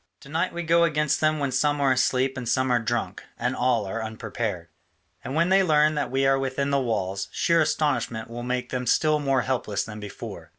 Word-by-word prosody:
To 140 Hz, -, -14 dB
night 165 Hz, +5 st, 0 dB
we 175 Hz, 0 st, -4 dB
go 170 Hz, +1 st, +4 dB
against 150 Hz, -3 st, +1 dB
them 155 Hz, 0 st, +2 dB
when 140 Hz, -2 st, -1 dB
some 145 Hz, +3 st, +1 dB
are 140 Hz, -2 st, +3 dB
asleep 130 Hz, +1 st, +1 dB
and 125 Hz, -3 st, -4 dB
some 130 Hz, +1 st, +1 dB
are 120 Hz, -, +3 dB
drunk, 120 Hz, +1 st, -2 dB, 0.2 s
and 125 Hz, +2 st, -1 dB
all 120 Hz, -4 st, +1 dB
are 110 Hz, +4 st, -4 dB
unprepared: 110 Hz, -5 st, -4 dB, 0.5 s
and 135 Hz, -, -5 dB
when 170 Hz, +2 st, +2 dB
they 195 Hz, +1 st, +5 dB
learn 155 Hz, -3 st, +3 dB
that 150 Hz, -, -2 dB
we 135 Hz, +1 st, +1 dB
are 135 Hz, 0 st, +3 dB
within 135 Hz, +1 st, -1 dB
the 140 Hz, -1 st, +2 dB
walls, 100 Hz, -5 st, -2 dB
sheer 170 Hz, -1 st, +2 dB
astonishment 130 Hz, -8 st, 0 dB
will 120 Hz, +1 st, -7 dB
make 125 Hz, 0 st, -3 dB
them 125 Hz, -1 st, -3 dB
still 155 Hz, +4 st, +3 dB
more 135 Hz, -3 st, +1 dB
helpless 120 Hz, -6 st, -1 dB
than 105 Hz, 0 st, -8 dB
before. 100 Hz, -5 st, -8 dB
130 Hz, 215 wpm, -25 LUFS, 115-150 Hz, 0.5 s, they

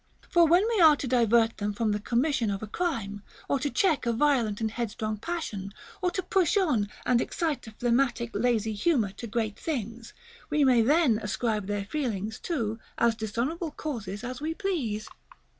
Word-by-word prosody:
For 340 Hz, -1 st, +6 dB
when 355 Hz, +7 st, +4 dB
we 420 Hz, -, +2 dB
are 315 Hz, -2 st, +8 dB
to 280 Hz, -, -5 dB
divert 235 Hz, -2 st, +3 dB
them 205 Hz, 0 st, -2 dB
from 220 Hz, 0 st, 0 dB
the 205 Hz, -, 0 dB
commission 240 Hz, +2 st, +1 dB
of 200 Hz, +1 st, -3 dB
a -, -, -4 dB
crime, 210 Hz, -, -3 dB, 0.3 s
or 280 Hz, -, +1 dB
to 290 Hz, -, -1 dB
check 315 Hz, -7 st, +1 dB
a -, -, +3 dB
violent 235 Hz, -5 st, +2 dB
and 220 Hz, -1 st, -1 dB
headstrong 215 Hz, -2 st, -3 dB
passion, 210 Hz, -, -5 dB, 0.3 s
or 365 Hz, -, +2 dB
to 375 Hz, +1 st, -3 dB
push 370 Hz, +1 st, +2 dB
on 260 Hz, -, +2 dB, 0.2 s
and 245 Hz, -1 st, +3 dB
excite 315 Hz, -8 st, -2 dB
a -, -, -8 dB
phlegmatic 240 Hz, 0 st, +1 dB
lazy 220 Hz, 0 st, +1 dB
humor 220 Hz, -, +1 dB
to 220 Hz, +4 st, -8 dB
great 215 Hz, -1 st, -2 dB
things, 230 Hz, -6 st, -4 dB, 0.4 s
we 300 Hz, -1 st, +2 dB
may 255 Hz, -3 st, +5 dB
then 270 Hz, -2 st, +3 dB
ascribe 210 Hz, -1 st, -1 dB
their 205 Hz, -1 st, -2 dB
failings 220 Hz, -6 st, -3 dB
to 230 Hz, -10 st, -2 dB, 0.2 s
as 235 Hz, 0 st, +3 dB
dishonorable 235 Hz, -, -2 dB
causes 225 Hz, -10 st, -5 dB
as 250 Hz, +2 st, -5 dB
we 320 Hz, +2 st, -2 dB
please. 285 Hz, -, -2 dB
235 Hz, 180 wpm, -28 LUFS, 215-300 Hz, 0.4 s, are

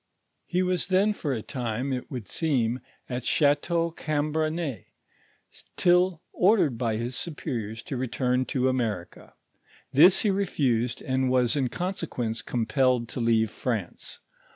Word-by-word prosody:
He 180 Hz, +1 st, +1 dB
was 180 Hz, -1 st, 0 dB
then 195 Hz, +3 st, +3 dB
for 150 Hz, -8 st, -3 dB
a 115 Hz, -5 st, -2 dB
time, 125 Hz, +1 st, -3 dB
it 125 Hz, -, -4 dB
would 125 Hz, -8 st, -6 dB
seem, 125 Hz, -, 0 dB, 0.3 s
at 125 Hz, -1 st, -4 dB
Chateau 165 Hz, +5 st, +2 dB
Cambrensis, 155 Hz, -2 st, -2 dB, 0.9 s
till 180 Hz, -1 st, +3 dB
or 205 Hz, +5 st, +4 dB
dered 145 Hz, -, +2 dB
by 115 Hz, -2 st, -1 dB
his 120 Hz, +2 st, -3 dB
superiors 115 Hz, -9 st, -4 dB
to 135 Hz, -, -4 dB
return 125 Hz, 0 st, 0 dB
to 130 Hz, 0 st, 0 dB
America; 110 Hz, -9 st, -3 dB, 0.6 s
this 175 Hz, +7 st, +7 dB
he 210 Hz, -, +2 dB
refused, 130 Hz, -, 0 dB
and 130 Hz, 0 st, 0 dB
was 125 Hz, -1 st, +3 dB
in 135 Hz, -3 st, +1 dB
conse 180 Hz, +7 st, -3 dB
quence 115 Hz, -4 st, -3 dB
compelled 120 Hz, +1 st, +1 dB
to -, -, -4 dB
leave 115 Hz, -2 st, +2 dB
France. 110 Hz, -9 st, -4 dB
130 Hz, 140 wpm, -27 LUFS, 120-165 Hz, 0.9 s, this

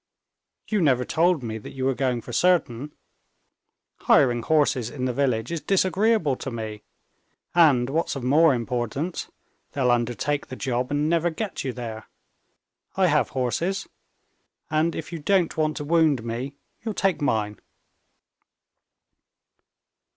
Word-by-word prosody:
"You 210 Hz, -3 st, 0 dB
never 130 Hz, -5 st, +3 dB
told 170 Hz, -3 st, +2 dB
me 110 Hz, -1 st, -4 dB
that -, -, -10 dB
you 130 Hz, -1 st, -3 dB
were 135 Hz, -, +2 dB
going 125 Hz, -1 st, -1 dB
for 120 Hz, -, -9 dB
certain. 150 Hz, -6 st, +1 dB, 1.1 s
Hiring 120 Hz, -3 st, +3 dB
horses 140 Hz, -4 st, +2 dB
in 130 Hz, -1 st, -4 dB
the 125 Hz, -, -1 dB
village 125 Hz, -1 st, 0 dB
is 170 Hz, -2 st, -3 dB
disagreeable 195 Hz, -, +2 dB
to -, -, -5 dB
me, 110 Hz, -3 st, -6 dB, 0.7 s
and, 145 Hz, -8 st, +5 dB
what's 155 Hz, +2 st, -1 dB
of 135 Hz, -, -5 dB
more 145 Hz, +3 st, +5 dB
importance, 125 Hz, +7 st, -3 dB, 0.4 s
they'll 130 Hz, -3 st, +2 dB
undertake 120 Hz, +5 st, -1 dB
the 130 Hz, -, -7 dB
job 125 Hz, -1 st, -2 dB
and 145 Hz, +1 st, 0 dB
never 170 Hz, +1 st, +2 dB
get 200 Hz, +4 st, -4 dB
you 130 Hz, -, -2 dB
there. 115 Hz, -3 st, -7 dB, 0.9 s
I 190 Hz, -, +4 dB
have 150 Hz, -1 st, +2 dB
horses. 165 Hz, +10 st, -1 dB, 0.8 s
And 160 Hz, +2 st, +1 dB
if 160 Hz, +2 st, -6 dB
you 165 Hz, -, -4 dB
don't 175 Hz, +2 st, +1 dB
want 155 Hz, -1 st, 0 dB
to -, -, -4 dB
wound 155 Hz, -5 st, +2 dB
me, 120 Hz, +4 st, -4 dB, 0.3 s
you'll 220 Hz, -3 st, -3 dB
take 195 Hz, -5 st, +1 dB
mine." 105 Hz, -6 st, 0 dB
140 Hz, 140 wpm, -24 LUFS, 120-165 Hz, 1.1 s, and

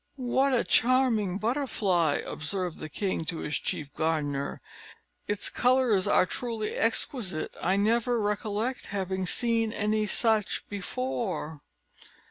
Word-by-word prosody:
"What 265 Hz, +1 st, +1 dB
a 250 Hz, -, +3 dB
charming 235 Hz, -6 st, +3 dB
butterfly!" 210 Hz, -, +1 dB
observed 180 Hz, +1 st, -3 dB
the 155 Hz, -, -6 dB
king 190 Hz, +1 st, -2 dB
to 165 Hz, -, -3 dB
his 150 Hz, -, -2 dB
chief 145 Hz, -2 st, -4 dB
gardener. 150 Hz, -3 st, -1 dB, 0.7 s
"Its 205 Hz, -1 st, 0 dB
colours 250 Hz, -6 st, +3 dB
are -, -, +5 dB
truly 225 Hz, +2 st, -3 dB
exquisite; 225 Hz, -, 0 dB
I 190 Hz, +2 st, +2 dB
never 230 Hz, +3 st, +2 dB
recollect 210 Hz, +4 st, -2 dB
having 190 Hz, -1 st, -2 dB
seen 230 Hz, +1 st, +1 dB
any 215 Hz, 0 st, 0 dB
such 220 Hz, -2 st, +1 dB
before." 195 Hz, -, -3 dB
210 Hz, 115 wpm, -28 LUFS, 180-235 Hz, 0.7 s, are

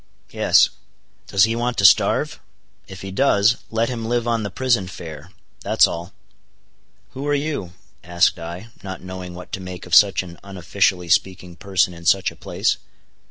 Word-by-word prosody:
"Yes." -, -, +4 dB, 0.6 s
"Does 95 Hz, -1 st, +3 dB
he 115 Hz, +1 st, +2 dB
want 120 Hz, +1 st, -2 dB
to 100 Hz, -, +2 dB
starve? -, -, +4 dB, 0.5 s
If 95 Hz, -1 st, -10 dB
he 95 Hz, -, -6 dB
does, 105 Hz, 0 st, +3 dB
let 115 Hz, +1 st, 0 dB
him 120 Hz, -3 st, -4 dB
live 120 Hz, 0 st, -1 dB
on 115 Hz, -1 st, 0 dB
the 105 Hz, -, -3 dB
prison 120 Hz, -1 st, 0 dB
fare, 80 Hz, -4 st, -9 dB, 0.3 s
that's -, -, +4 dB
all." 85 Hz, +2 st, -5 dB, 1.0 s
"Who 135 Hz, +2 st, -6 dB
are 145 Hz, -, +2 dB
you?" 140 Hz, -, -3 dB, 0.3 s
asked 85 Hz, 0 st, +2 dB
I, 85 Hz, +6 st, -8 dB
not 95 Hz, -1 st, -7 dB
knowing 90 Hz, -1 st, -8 dB
what 90 Hz, 0 st, -11 dB
to -, -, -4 dB
make 90 Hz, -1 st, -8 dB
of 90 Hz, -, -10 dB
such 100 Hz, -1 st, +6 dB
an 85 Hz, -2 st, -12 dB
unofficially 95 Hz, -2 st, -1 dB
speaking 90 Hz, 0 st, 0 dB
person 95 Hz, -1 st, 0 dB
in 85 Hz, 0 st, -13 dB
such 95 Hz, +2 st, +3 dB
a -, -, -15 dB
place. -, -, -1 dB
95 Hz, 170 wpm, -21 LUFS, 90-115 Hz, 1.0 s, such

